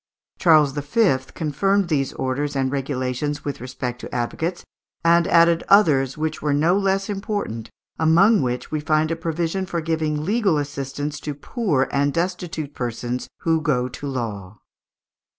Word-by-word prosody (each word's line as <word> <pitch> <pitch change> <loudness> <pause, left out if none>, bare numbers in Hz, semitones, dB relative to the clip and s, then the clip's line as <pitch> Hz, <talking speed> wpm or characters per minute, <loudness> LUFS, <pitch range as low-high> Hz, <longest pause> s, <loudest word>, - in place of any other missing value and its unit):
Charles 155 -5 +5
V. 145 +4 +2 0.2
confirmed 195 +6 +1
these 140 -5 0
orders 140 +3 -2
and 135 -1 0
regulations 135 +1 -2
with 145 -3 -4
respect 125 -1 -5
to - - -8
advocates, 160 +9 -2 0.4
and 170 0 +5
added 170 0 +4
others 145 -10 +4
which 155 0 -2
were 145 -2 +1
no 165 +5 +3
less 195 0 +1
important, 195 - -4 0.3
among 180 +7 +5
which 125 -1 -3
we 155 - -1
find 155 +1 +1
a - - +1
provision 165 +3 -2
for 170 - -2
giving 155 -2 -1
"legal 200 -4 +2
assistance 145 +1 -4
to 150 -1 -5
poor 145 - 0
and 140 0 +1
destitute 170 -4 -3
persons 120 0 -3
who 165 -1 +1
go 125 -5 +1
to 135 +3 -7
law." 105 -7 -5
150 Hz, 150 wpm, -22 LUFS, 135-170 Hz, 0.4 s, Charles